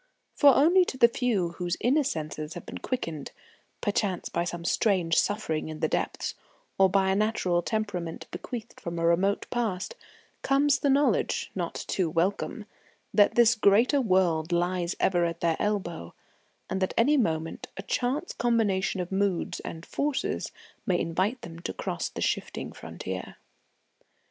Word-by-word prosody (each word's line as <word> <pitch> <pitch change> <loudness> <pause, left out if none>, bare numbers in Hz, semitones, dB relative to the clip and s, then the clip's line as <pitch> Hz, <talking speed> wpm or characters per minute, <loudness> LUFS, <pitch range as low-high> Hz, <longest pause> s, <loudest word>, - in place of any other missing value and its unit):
For 280 -4 +6
only 345 +6 +6
to 260 - -5
the 235 - +7
few 235 -7 0
whose 175 0 -3
inner 280 +5 +3
senses 155 - -4
have 175 - -8
been - - -7
quickened, 165 - -4 0.5
perchance 200 -3 -1
by 170 - -1
some 175 -1 -5
strange 180 -5 +2
suffering 160 -7 0
in 155 -1 -7
the - - +1
depths, - - -2 0.5
or 190 0 +6
by 190 0 +3
a - - +2
natural 195 -4 +1
temperament 185 -5 -3
bequeathed 235 -2 -7
from 170 0 -5
a 165 - 0
remote 185 +4 +2
past, 225 - -2 0.5
comes 280 +1 +3
the 285 - +1
knowledge, 280 +2 +2
not - - -3
too 180 -4 0
welcome, 185 +6 -1 0.5
that 205 -1 +5
this 235 -1 +6
greater 230 +6 +4
world 180 -6 +2
lies 175 +1 0
ever 175 -2 +2
at 170 0 -2
their 165 -1 +2
elbow, 185 - -2 0.5
and 190 - -3
that 185 - 0
any 265 +6 +4
moment 165 - -1
a 195 - -5
chance 265 - -1
combination 205 -6 +1
of 180 - -6
moods 190 -2 0
and 165 +1 -7
forces 285 -1 -2 0.3
may 180 -2 +1
invite 190 +10 -1
them 165 -6 -8
to 170 - -4
cross - - -3
the - - -7
shifting - - -2
frontier. - - -7
190 Hz, 155 wpm, -27 LUFS, 170-235 Hz, 0.5 s, the